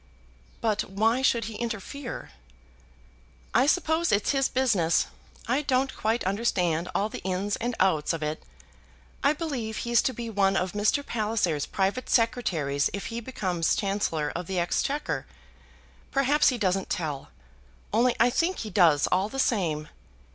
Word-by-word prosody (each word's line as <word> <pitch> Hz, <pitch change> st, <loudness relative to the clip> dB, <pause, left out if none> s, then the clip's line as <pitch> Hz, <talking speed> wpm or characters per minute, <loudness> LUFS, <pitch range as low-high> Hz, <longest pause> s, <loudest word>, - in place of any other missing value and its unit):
"But 215 Hz, -2 st, +1 dB
why 220 Hz, +6 st, +2 dB
should 235 Hz, -4 st, +2 dB
he 220 Hz, -1 st, -6 dB
interfere?" 235 Hz, +3 st, -5 dB, 1.2 s
"I 250 Hz, +4 st, +4 dB
suppose 320 Hz, +1 st, +2 dB
it's 205 Hz, 0 st, +2 dB
his 270 Hz, -2 st, +1 dB
business. 205 Hz, -11 st, +2 dB, 0.4 s
I 255 Hz, +5 st, +2 dB
don't 265 Hz, -2 st, 0 dB
quite 225 Hz, +2 st, 0 dB
understand 185 Hz, -4 st, 0 dB
all 205 Hz, -, +2 dB
the -, -, -7 dB
ins 190 Hz, +2 st, -1 dB
and 240 Hz, +1 st, -2 dB
outs 170 Hz, -6 st, +2 dB
of 165 Hz, -2 st, -3 dB
it. 150 Hz, +1 st, -3 dB, 0.8 s
I 285 Hz, -, +4 dB
believe 265 Hz, -9 st, -4 dB
he's 235 Hz, 0 st, +2 dB
to -, -, 0 dB
be 235 Hz, -1 st, -6 dB
one 195 Hz, -3 st, +2 dB
of 185 Hz, 0 st, 0 dB
Mr. 210 Hz, +8 st, +1 dB
Palliser's 210 Hz, -9 st, 0 dB
private 195 Hz, +6 st, -1 dB
secretaries 170 Hz, -, +1 dB
if 200 Hz, -, -4 dB
he 235 Hz, -, -2 dB
becomes 185 Hz, -9 st, -1 dB
Chancellor 195 Hz, -7 st, -1 dB
of 175 Hz, -1 st, -4 dB
the 190 Hz, -, -3 dB
Exchequer. 275 Hz, -, -1 dB, 0.8 s
Perhaps 275 Hz, +2 st, +3 dB
he 255 Hz, -, -1 dB
doesn't 195 Hz, -3 st, 0 dB
tell; 150 Hz, -5 st, -3 dB, 0.6 s
only 240 Hz, +2 st, +3 dB
I 240 Hz, +2 st, +5 dB
think 335 Hz, +8 st, 0 dB
he 215 Hz, -, -6 dB
does 165 Hz, -6 st, +5 dB
all 190 Hz, +3 st, +2 dB
the 270 Hz, -, -7 dB
same. 170 Hz, -, 0 dB
215 Hz, 150 wpm, -27 LUFS, 180-250 Hz, 1.2 s, I